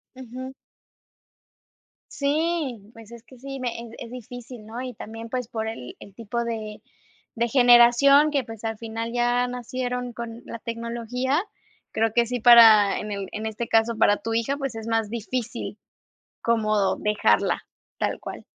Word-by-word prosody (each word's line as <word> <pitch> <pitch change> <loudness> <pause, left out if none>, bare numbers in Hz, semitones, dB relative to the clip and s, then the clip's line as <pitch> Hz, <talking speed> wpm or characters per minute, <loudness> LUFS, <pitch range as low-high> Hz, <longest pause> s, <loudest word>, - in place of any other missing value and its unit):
Ujú. 260 +1 -8 1.6
Sí, 295 -4 -1
pues, 225 0 -14
es 235 - -11
que 255 +1 -17
sí, 270 +1 -7
me 250 -1 -1
eh, 235 0 -8
es - - -8
difícil, 245 -1 -10
¿no? 230 +3 -6
Y 255 -2 -6
también, 225 +2 -8
pues, 250 -1 -3
por 220 -2 -4
el 175 - -7
el 200 - -13
tipo 235 +1 -3
de 220 -2 -5 0.5
de 235 +1 +1
generación 245 +4 +6
que, 280 -3 +1
pues, 225 -2 -10
al 225 -1 -3
final, 230 0 -4
ya 245 +1 +2
nacieron 250 0 -4
con 235 0 -7
la - - -7
tecnología, 235 +4 -2 0.5
creo 225 0 +1
que 235 0 +3
sí 245 +1 -3
para 225 -4 +8
en 210 0 -6
el 200 -2 -4
en 215 +1 -5
este 220 +2 -4
caso 225 +1 +2
para 205 -2 +4
tu 225 - -4
hija, 230 +5 0
pues, 275 -3 -3
es 225 0 -7
más 225 -2 0
difícil 235 +1 -4 0.6
como 215 -4 +1
dejarla. 205 - +2 0.4
Tal - - -1
cual. - - -8
235 Hz, 160 wpm, -24 LUFS, 225-250 Hz, 1.6 s, para